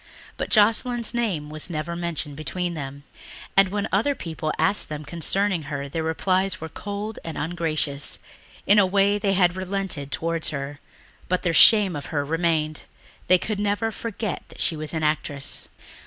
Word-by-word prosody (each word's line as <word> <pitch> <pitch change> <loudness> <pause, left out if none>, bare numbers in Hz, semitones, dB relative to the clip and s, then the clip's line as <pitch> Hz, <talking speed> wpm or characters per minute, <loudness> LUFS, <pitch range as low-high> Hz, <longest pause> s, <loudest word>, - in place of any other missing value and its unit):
But - - -4
Joscelyn's 230 +2 +3
name 190 -11 -1
was 155 +3 -3
never 165 +1 -3
mentioned 170 -4 -3
between 175 +4 -3
them, 140 -2 -6 0.5
and 195 0 +6
when 205 +1 -1
other 230 +9 +2
people 160 -5 -4
asked 200 0 +2
them 150 0 -5
concerning 180 +3 +1
her 140 -1 -3
their 160 +4 -3
replies 185 +4 +1
were 160 - -6
cold 205 +4 -5
and 165 - -6
ungracious. 155 -3 -1 0.5
In 205 +1 +6
a 200 - +6
way 200 +2 +3
they 200 -1 +1
had 180 -2 +3
relented 185 -6 -3
towards 165 0 0
her, 145 -1 -5 0.5
but 185 0 +1
their 170 - +1
shame 200 0 +7
of 145 - -5
her 145 -3 -1
remained. 160 -1 0 0.5
They 185 - +6
could 210 +3 -3
never 205 +2 0
forget 220 -2 -4
that - - -14
she 165 - +1
was 155 0 -2
an 160 - -1
actress. 150 -2 0
170 Hz, 170 wpm, -24 LUFS, 155-200 Hz, 0.5 s, shame